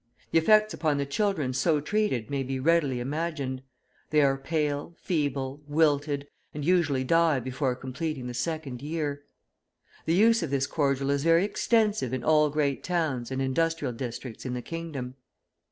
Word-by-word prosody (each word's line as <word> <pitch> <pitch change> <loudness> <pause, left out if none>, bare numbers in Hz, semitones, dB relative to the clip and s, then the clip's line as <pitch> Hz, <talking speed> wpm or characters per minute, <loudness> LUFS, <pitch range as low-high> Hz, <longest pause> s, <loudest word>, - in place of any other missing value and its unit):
The 165 - +5
effects 215 +5 +4
upon 155 -3 0
the 140 - 0
children 150 -3 0
so 150 +4 +2
treated 150 - -1
may 140 -1 0
be 135 0 -3
readily 145 -3 +2
imagined. 140 -1 -3 0.5
They 150 -1 +4
are 135 -1 +3
pale, 145 +2 -2
feeble, 145 -5 -2
wilted, 145 -2 +1 0.3
and 150 -1 -4
usually 160 -7 +2
die 165 0 +3
before 130 +1 -2
completing 135 +2 -4
the 125 - -5
second 140 -2 -3
year. 145 -1 -3 0.8
The 165 - +2
use 225 +3 +5
of 165 - -2
this 135 -1 +1
cordial 140 -2 0
is 140 0 0
very 165 +3 +4
extensive 210 - +1
in 125 - -5
all 150 0 +4
great 145 -2 0
towns 155 -9 -1
and 135 0 -2
industrial 150 0 0
districts 120 -1 -6
in 125 -1 -3
the 125 - -5
kingdom. 145 -7 -6
145 Hz, 160 wpm, -27 LUFS, 130-165 Hz, 0.8 s, The